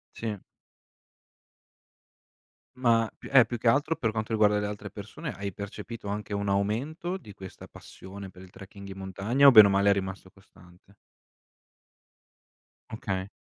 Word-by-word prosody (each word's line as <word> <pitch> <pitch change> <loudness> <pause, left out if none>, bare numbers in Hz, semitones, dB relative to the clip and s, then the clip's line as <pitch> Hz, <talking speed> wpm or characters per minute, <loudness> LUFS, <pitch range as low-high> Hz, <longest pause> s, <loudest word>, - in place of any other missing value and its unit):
Sì. 110 -3 -4 2.4
Ma 115 -3 +2
più - - -12
eh, 130 -4 +7
più 120 - -4
che 115 +1 0
altro, 145 +6 +2
per 120 -8 -1
quanto 110 +1 -4
riguarda 105 -1 +3
le 105 - -1
altre 105 -1 -7
persone, 110 - -7
hai 100 -1 -5
percepito 105 +2 -8
anche 105 0 -4
un 100 0 -2
aumento 135 - -1
di 110 - -12
questa 95 -1 -11
passione 95 0 -11
per 90 0 -15
il 95 - -14
trekking 100 +1 -12
in 95 0 -9
montagna, 100 +9 +1
o 135 - +10
bene 105 -3 +10
o - - 0
male 100 +1 +3
è - - +6
rimasto 95 -1 -4
costante? 95 0 -21 2.0
Okay. 95 -3 -4
105 Hz, 150 wpm, -27 LUFS, 100-115 Hz, 2.4 s, o